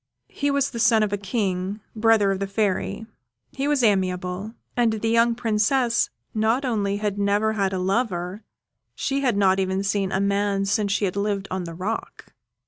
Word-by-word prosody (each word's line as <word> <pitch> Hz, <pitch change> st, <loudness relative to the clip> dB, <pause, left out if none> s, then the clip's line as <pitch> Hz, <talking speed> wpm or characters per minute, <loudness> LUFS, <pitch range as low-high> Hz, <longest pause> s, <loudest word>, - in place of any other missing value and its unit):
He 285 Hz, -, -1 dB
was 280 Hz, 0 st, +1 dB
the 235 Hz, -, -5 dB
son 225 Hz, -1 st, +4 dB
of 205 Hz, -1 st, -1 dB
a -, -, +3 dB
King, 195 Hz, -1 st, -2 dB, 0.2 s
brother 220 Hz, -2 st, +4 dB
of 195 Hz, -, -2 dB
the 195 Hz, -, -2 dB
Fairy; 205 Hz, +2 st, -1 dB, 0.5 s
he 275 Hz, +1 st, -2 dB
was 290 Hz, -3 st, +2 dB
amiable; 190 Hz, 0 st, 0 dB, 0.2 s
and 235 Hz, -2 st, +2 dB
the 220 Hz, +1 st, -1 dB
young 230 Hz, 0 st, +3 dB
Princess 235 Hz, +1 st, +1 dB, 0.2 s
not 225 Hz, +5 st, +1 dB
only 205 Hz, -5 st, 0 dB
had 205 Hz, -1 st, -2 dB
never 205 Hz, +2 st, +2 dB
had 195 Hz, -3 st, 0 dB
a 190 Hz, -, -2 dB
lover, 190 Hz, -1 st, -1 dB, 0.5 s
she 275 Hz, 0 st, -1 dB
had 245 Hz, -7 st, +1 dB
not 195 Hz, -1 st, +3 dB
even 190 Hz, 0 st, 0 dB
seen 195 Hz, -1 st, 0 dB
a 190 Hz, -, 0 dB
man 200 Hz, 0 st, +1 dB
since 205 Hz, 0 st, 0 dB
she 205 Hz, -, +1 dB
had 185 Hz, -, -2 dB
lived 200 Hz, -1 st, -1 dB
on 185 Hz, -1 st, -2 dB
the 165 Hz, -1 st, -7 dB
rock. 200 Hz, +6 st, -5 dB
205 Hz, 185 wpm, -24 LUFS, 195-225 Hz, 0.5 s, son